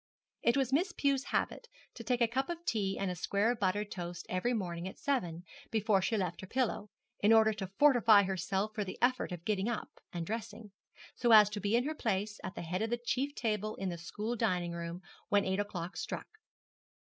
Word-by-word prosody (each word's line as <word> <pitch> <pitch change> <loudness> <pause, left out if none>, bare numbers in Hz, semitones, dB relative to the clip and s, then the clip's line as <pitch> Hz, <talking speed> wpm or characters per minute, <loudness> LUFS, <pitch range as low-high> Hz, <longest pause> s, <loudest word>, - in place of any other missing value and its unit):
It 235 +3 +3
was 265 -1 +1
Miss 355 +8 +2
Pew's 275 -1 +1
habit 475 - -1 0.3
to 230 - -8
take 245 +2 0
a 235 - +5
cup 265 +5 -1
of 345 0 -5
tea 200 -4 0
and 195 -2 0
a - - -4
square 200 +6 +1
of 245 - -4
buttered 205 +1 0
toast 175 -1 -5
every 185 +7 0
morning 180 -6 -2
at 190 - -8
seven, 175 -12 -1 0.3
before 215 -3 +2
she 220 +4 0
left 180 -2 -2
her 190 - -8
pillow; 230 -3 -1 0.3
in 210 - +4
order 220 -1 +6
to 200 -2 -5
fortify 230 -8 +6
herself 195 +2 -1
for 210 -1 -1
the 185 - -6
effort 255 -4 +1
of 175 -1 -7
getting 210 0 0
up 235 - -3 0.2
and 170 -1 -4
dressing, 215 0 -5 0.4
so 240 -2 +1
as 210 -1 +8
to 210 - -3
be 205 +2 +1
in 240 - +3
her 305 +3 -2
place, 210 -6 -2
at 195 - -5
the - - -5
head 180 +4 -2
of 225 - 0
the 240 - 0
chief 260 +4 -2
table 215 -2 -1
in 195 - -3
the 175 - -4
school 210 +7 -4
dining 180 -7 0
room, 170 +1 -5 0.3
when 205 -1 +3
eight 190 +1 0
o'clock 185 -3 -4
struck. 435 - -6
210 Hz, 215 wpm, -33 LUFS, 190-235 Hz, 0.4 s, as